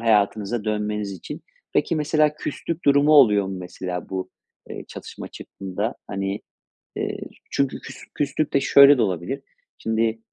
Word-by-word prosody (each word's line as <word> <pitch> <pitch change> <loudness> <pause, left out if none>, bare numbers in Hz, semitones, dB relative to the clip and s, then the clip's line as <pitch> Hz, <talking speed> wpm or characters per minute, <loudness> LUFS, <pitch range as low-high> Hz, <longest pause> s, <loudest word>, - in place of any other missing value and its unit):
hayatınıza 105 0 +2
dönmeniz 105 -1 -1
için 95 - -8 0.3
Peki, - - +1
mesela 150 0 +2
küslük 165 +3 -4
durumu 145 +2 +5
oluyor 105 -9 +6
mu 95 0 -4
mesela 90 0 -5
bu, 95 -1 -4 0.4
eee, - - -6
çatışma - - -8
çıktığında? 100 +4 -5
Hani, 95 +1 -3 0.6
eee, - - -2 0.3
çünkü 140 -1 0
küs - - -10 0.2
küslük 145 +1 -1
de 140 - +4
şöyle 140 +1 +8
de - - +2
olabilir, 100 - -1 0.4
şimdi, 110 0 0
110 Hz, 140 wpm, -23 LUFS, 100-140 Hz, 0.6 s, şöyle